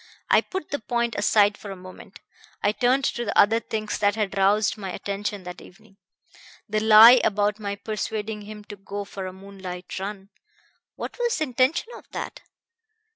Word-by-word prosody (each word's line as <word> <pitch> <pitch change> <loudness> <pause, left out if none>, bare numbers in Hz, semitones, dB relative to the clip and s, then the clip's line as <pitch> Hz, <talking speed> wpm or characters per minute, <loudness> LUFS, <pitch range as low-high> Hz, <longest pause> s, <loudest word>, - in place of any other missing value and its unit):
I - - +6
put 375 -5 -6
the 285 - -1
point 235 +1 -1
aside 205 0 +3
for 205 - -9
a 195 - -6
moment. 185 +1 -13 0.4
I 205 - +4
turned 250 +4 +1
to 240 - -1
the 205 - -2
other 225 +3 +5
things 215 -2 -4
that 205 0 +2
had 210 -3 -2
roused 200 +2 +3
my 200 -3 -6
attention 200 +1 -4
that 180 0 -9
evening. 200 +1 -18 0.7
The 215 +1 0
lie 220 +3 +9
about 210 0 +1
my 200 -1 -3
'persuading 215 0 -4
him 210 0 -10
to 205 0 -10
go 200 +1 -6
for 195 -1 -6
a - - -6
moonlight 190 -1 -8
run.' 195 0 -6 0.7
What - - -7
was 475 -1 +1
the 315 - 0
intention 265 - 0
of - - -13
that? - - -6
210 Hz, 180 wpm, -24 LUFS, 200-220 Hz, 0.7 s, lie